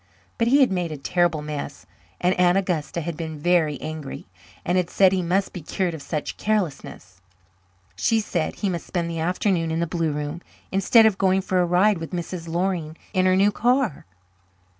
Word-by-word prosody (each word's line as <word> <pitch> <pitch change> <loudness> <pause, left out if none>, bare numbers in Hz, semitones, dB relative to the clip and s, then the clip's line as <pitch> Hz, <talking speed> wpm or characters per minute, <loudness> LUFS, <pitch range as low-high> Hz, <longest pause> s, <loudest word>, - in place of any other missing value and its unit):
But 230 - +2
he 280 +4 +5
had 260 - +4
made 175 -3 -1
a 155 - -5
terrible 165 +2 0
mess 145 -1 -6 0.3
and 180 +1 +2
Aunt 180 +1 +4
Augusta 170 -4 -1
had 170 0 -4
been 160 -1 -5
very 155 -2 +1
angry 155 -3 -6 0.4
and 175 - +1
had 180 -2 +1
said 190 -2 +4
he 190 -1 +1
must 185 +3 0
be 180 - -6
cured 180 +3 -2
of 160 - -7
such 150 0 -4
carelessness. 165 - -3 0.7
She 225 - +2
said 175 -6 -2
he 200 - -2
must 175 -2 -4
spend 170 -2 -2
the 165 - -4
afternoon 175 0 0
in 160 +1 -1
the 170 - +1
blue 165 -1 -1
room 150 +3 -4 0.3
instead 200 +4 +5
of 210 -3 +2
going 190 0 +3
for 185 -1 +1
a 175 - +1
ride 185 +2 +3
with 165 +2 -7
Mrs. 175 -1 -5
Loring 170 -2 -2 0.2
in 185 -1 +3
her 185 - +4
new 200 +2 +4
car. 245 - 0
175 Hz, 195 wpm, -23 LUFS, 160-190 Hz, 0.7 s, he